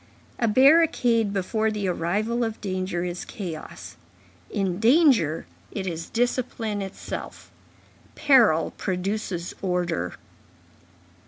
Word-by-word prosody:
A 230 - +2
barricade 255 -3 +4
before 215 +3 0
the 210 -2 -2
arrival 205 +8 0
of 225 -1 -3
danger 185 -3 -2
is 175 0 -4
chaos; 170 -7 -8 0.5
in 190 -2 -1
danger, 230 - +4 0.2
it 195 -3 -5
is 165 -3 -4
discipline 235 -3 -1
itself. 195 0 -7 0.6
Peril 245 - +4
produces 185 -2 -3
order. 175 - -1
205 Hz, 95 wpm, -25 LUFS, 180-230 Hz, 0.6 s, barricade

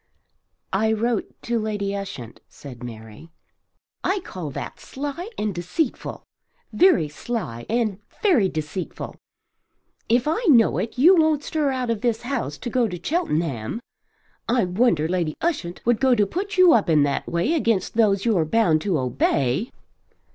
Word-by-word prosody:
"I 220 +3 +2
wrote 230 0 -1
to 235 -1 0
Lady 205 -2 -2
Ushant," 190 - -7
said 130 -5 -11
Mary. 110 +5 -10 0.7
"I 390 +1 +1
call 180 - -6
that 135 - -7
sly 290 +8 -5
and 210 -1 -1
deceitful; 180 - -3 0.5
very 350 - +4
sly 150 - -5
and 220 -4 0 0.2
very 280 - +4
deceitful. 155 +3 -5 0.9
If 240 +4 +3
I 320 +9 +1
know 235 -6 +5
it 225 - -4
you 340 +9 +7
won't 315 -3 +3
stir 300 -2 0
out 255 -3 -1
of 220 -3 -2
this 235 -2 0
house 240 - -3
to 245 - -5
go 245 -1 +2
to 180 -4 -6
Cheltenham. 165 - -1 0.7
I 235 -3 +3
wonder 180 -4 +2
Lady 170 -3 -1
Ushant 270 - -2
would 240 -1 +3
go 260 -2 +4
to 210 -3 +3
put 385 - -4
you 365 -2 +7
up 215 -6 +3
in 155 -3 +5
that 140 -1 -1
way 170 - 0
against 230 - +1
those 205 -3 +2
you're 210 -8 +3
bound 160 -2 +2
to 190 -4 0
obey." 130 - 0
215 Hz, 155 wpm, -23 LUFS, 165-255 Hz, 0.9 s, you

